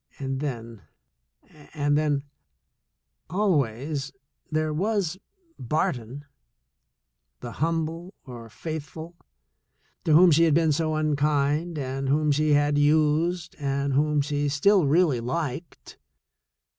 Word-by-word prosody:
And 135 -1 -3
then 115 -6 -5 0.4
— 65 - -51 0.3
and 145 -1 +1
then 145 -2 +1 0.5
— - - -52
always 140 - 0 0.4
there 155 0 -1
was 190 0 -1 0.4
Barton, 130 0 -2 1.2
the 120 - -6
humble 165 +4 -3
or 120 -3 -10
faithful, 160 +5 -7 0.9
to 160 - +3
whom 175 +3 +7
she 165 +2 +5
had 155 -3 +3
been 165 -1 +3
so 155 +1 0
un 155 -1 0
kind 150 +3 0
and 135 -1 -3
whom 150 +1 +2
she 150 +1 +2
had 145 0 +2
used 155 +3 +1
and 140 -1 -1
whom 150 +1 +2
she 145 0 -1
still 175 +4 +3
really 155 -3 +3
liked. 140 +5 -5
150 Hz, 120 wpm, -25 LUFS, 140-160 Hz, 1.2 s, whom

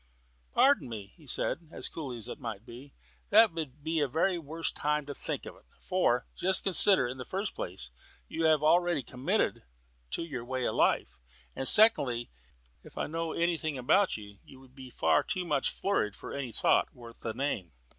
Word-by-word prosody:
"Pardon 265 - +3
me," 105 -4 -8
he 155 - -19
said, 160 +4 -1
as - - -3
coolly 135 -6 -6
as 110 - -4
might 110 -2 -6
be, 130 +4 -12 0.3
"that 220 0 +7
would 150 -3 -6
be 160 0 0
the 145 - +2
very 170 +6 +1
worst 160 +1 -4
time 150 0 0
to 145 - -6
think - - -4
of - - -9
it. - - -22
For, 130 -9 +1
just 190 0 +3
consider: 190 -6 +4
in 130 +2 -6
the - - -4
first 195 +9 -3
place 85 -9 -6 0.4
you 165 - -3
will 155 -1 +4
already 175 -1 +3
be - - -15
committed 125 +1 0 0.5
to 65 - -2
your 135 -8 -5
way 130 0 -3
of - - 0
life, - - +1 0.4
and 135 - -2
secondly, 135 - +5 0.5
if - - -16
I - - -1
know 165 +1 -3
anything 165 -4 -1
about 185 - +2
you, 105 -2 -12
you 130 - -15
would 130 -1 -18
be 130 -1 -11
far - - +2
too 185 -1 -3
much 145 -5 +1
flurried 110 - -1
for - - -9
any 135 -4 -4
thought - - +2
worth 115 -1 -12
the 110 -2 -4
name." 115 - -2
145 Hz, 195 wpm, -30 LUFS, 120-165 Hz, 0.5 s, that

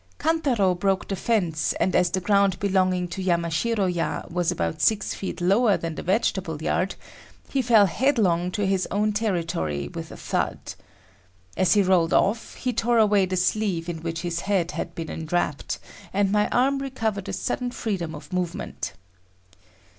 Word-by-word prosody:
Kantaro 270 - +2
broke 195 +2 0
the 195 - -2
fence 180 -7 0
and 185 - 0
as 180 -1 +4
the 185 - -1
ground 200 -1 +2
belonging 185 -2 +1
to 190 - -5
Yamashiro 180 +4 +1
ya 175 -2 -1
was 175 -1 0
about 85 -1 -2
six 220 -2 +2
feet 190 - -5
lower 200 +4 +3
than 165 -1 -4
the - - -6
vegetable 185 -4 0
yard, 185 +4 0 0.5
he 270 - +1
fell 225 -4 +6
headlong 190 - +2
to 205 +2 -1
his 190 -1 +1
own 210 +2 +1
territory 170 - -1
with - - -7
a - - -9
thud. - - -2 0.8
As 185 +2 +3
he 205 - +5
rolled 180 -3 +3
off 220 +3 +1
he 250 -1 -2
tore 235 +1 +1
away 205 -3 +4
the 185 0 -2
sleeve 185 -2 0
in 165 -2 -4
which 165 0 -3
his 170 -1 -2
head 185 -3 0
had - - -5
been 165 -1 -5
enwrapped, 160 -2 -2 0.3
and 195 0 +1
my 210 0 +2
arm 275 +3 +2
recovered 220 -7 -3
a - - -2
sudden 250 -1 -2
freedom 190 -10 -3
of 150 +5 -11
movement. 180 -2 -3
190 Hz, 170 wpm, -25 LUFS, 170-210 Hz, 0.8 s, fell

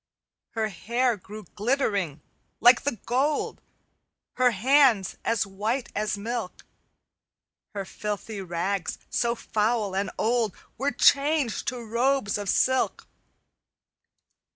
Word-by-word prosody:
"Her 220 -1 -1
hair 235 +6 0
grew 210 +3 -10
glittering, 205 - 0 0.4
like 245 +2 +7
the 285 - 0
gold, 275 +5 0 0.7
Her 255 -1 +4
hands 245 -2 +3
as 230 -2 +1
white 215 +6 -2
as 210 0 -1
milk; 225 -2 -5 1.1
Her 200 -1 -3
filthy 210 +1 -5
rags, 180 +1 -2
so 235 -1 +1
foul 215 -3 0
and 195 0 0
old, 225 -3 +1 0.2
Were 275 +4 0
changed 285 -3 +2
to 245 -1 -3
robes 235 -2 +1
of 200 -2 -4
silk. 260 +6 +1
225 Hz, 105 wpm, -26 LUFS, 200-250 Hz, 1.1 s, like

